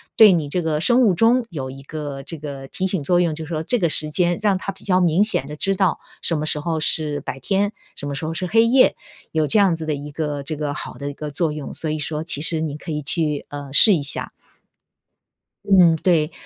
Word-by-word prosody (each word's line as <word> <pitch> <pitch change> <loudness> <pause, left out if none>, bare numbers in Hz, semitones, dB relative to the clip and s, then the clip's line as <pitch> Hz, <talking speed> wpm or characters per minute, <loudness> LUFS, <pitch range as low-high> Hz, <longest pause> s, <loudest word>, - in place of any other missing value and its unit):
对 215 -3 +8
你 165 -5 0
这 175 +5 -2
个 160 -2 -1
生 240 +10 +3
物 215 -7 +4
钟 230 +5 +3
有 135 -7 -6
一 135 +1 -11
个 145 -1 -7
这 160 +3 -7
个 140 -2 -8
提 185 - -4
醒 190 -3 -1
作 175 +5 +2
用， 170 -3 +1
就 160 +1 -7
是 - - -13
说 160 -2 -3
这 245 +8 0
个 170 -4 +1
时 155 0 +2
间 175 +2 +1
让 200 -3 +2
它 195 - -4
比 195 - -15
较 185 -2 +2
明 175 +2 +3
显 210 -10 0
的 150 - -7
知 195 +5 +1
道 190 -2 +1 0.2
什 165 - +1
么 150 - -3
时 155 - +1
候 160 +1 -2
是 155 -1 +1
白 135 - -6
天， 200 - -1 0.2
什 145 - -6
么 145 - -4
时 150 +3 -3
候 160 - -3
是 180 - -2
黑 225 +5 +4
夜， 255 +2 +4 0.4
有 155 -1 0
这 140 - +3
样 195 -5 +4
子 160 -1 -7
的 150 - 0
一 145 +1 -8
个 145 -1 -4
这 155 +3 -4
个 150 -1 -3
好 - - -7
的 140 0 -4
一 - - -7
个 150 +1 -7
作 160 +1 -1
用， 150 -2 -7
所 160 - -5
以 155 - -2
说 150 +1 -4
其 145 - -1
实 160 0 +2
你 150 -2 -4
可 160 - -8
以 150 -1 -3
去， 150 0 -1
呃， 145 -1 -8
试 205 +8 +8
一 160 - -2
下。 140 - +1 1.3
嗯， 180 -4 +5
对。 160 -3 +1
160 Hz, 275 characters per minute, -21 LUFS, 150-185 Hz, 1.3 s, 对